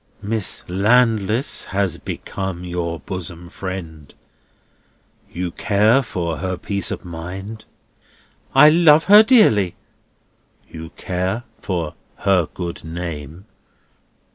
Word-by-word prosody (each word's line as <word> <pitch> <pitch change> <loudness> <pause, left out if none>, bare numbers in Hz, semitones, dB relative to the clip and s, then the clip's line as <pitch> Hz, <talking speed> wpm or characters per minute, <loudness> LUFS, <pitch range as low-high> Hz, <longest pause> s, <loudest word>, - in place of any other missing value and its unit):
Miss 105 -1 -2
Landless 110 +4 +2
has 95 -1 -1
become 95 -2 -5
your 85 -2 -3
bosom 90 -2 -7
friend. 85 -7 -7 1.2
You 90 0 -4
care 110 +7 +3
for 85 - -3
her 95 +3 -3
peace 100 +2 -2
of - - -6
mind?" 95 +6 -7 0.9
"I 150 +3 +8
love 160 -1 +6
her 205 +2 +8
dearly." 210 - +4 0.9
"You 80 0 -9
care 95 +5 -2 0.2
for 85 -5 -3 0.2
her 95 -5 +2
good 85 -2 -6
name?" 80 0 -7
95 Hz, 100 wpm, -20 LUFS, 85-110 Hz, 1.2 s, I